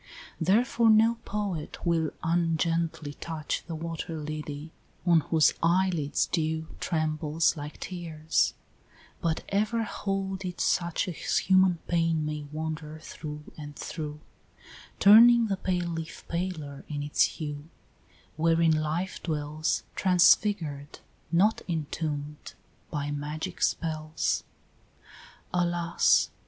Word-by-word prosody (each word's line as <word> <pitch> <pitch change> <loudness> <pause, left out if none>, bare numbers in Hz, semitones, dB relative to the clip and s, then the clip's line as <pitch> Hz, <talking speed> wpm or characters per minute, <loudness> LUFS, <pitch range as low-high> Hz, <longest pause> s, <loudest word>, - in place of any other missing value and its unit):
XVIII. 190 - +3
Therefore 235 -1 +3
no 220 +2 +5
poet 200 -8 -4
will 165 -2 +2
ungently 165 -2 0
touch 160 -2 -3
The 165 - -4
water 165 0 -5
lily, 150 0 -6 0.3
on 170 -2 +6
whose 160 0 +3
eyelids 170 -3 +2
dew 160 -1 -1
Trembles 155 0 0
like 150 0 -7
tears; 165 -3 -1 0.7
but 165 -1 -1
ever 215 +3 +1
hold 195 -2 -3
it 180 -1 -5
such 170 0 +1
As 175 - -1
human 185 -2 +4
pain 165 -2 +1
may 150 -1 -4
wander 155 0 -4
through 150 -1 -8
and 145 -1 -9
through, 150 -1 -6 0.8
Turning 235 +3 +8
the 195 - 0
pale 180 -2 -1
leaf 165 0 -6
paler 170 -5 -4
in 145 -1 -4
its 145 - +2
hue 150 -1 -6 0.7
Wherein 165 0 +3
life 155 +5 -2
dwells, 155 -1 -1
transfigured, 175 -5 +3 0.3
not 195 +6 +3
entomb'd, 150 -2 -4 0.3
By 145 -1 -3
magic 155 +4 -4
spells. 155 -1 0 1.1
Alas! 175 -1 +2
165 Hz, 110 wpm, -28 LUFS, 155-180 Hz, 1.1 s, Turning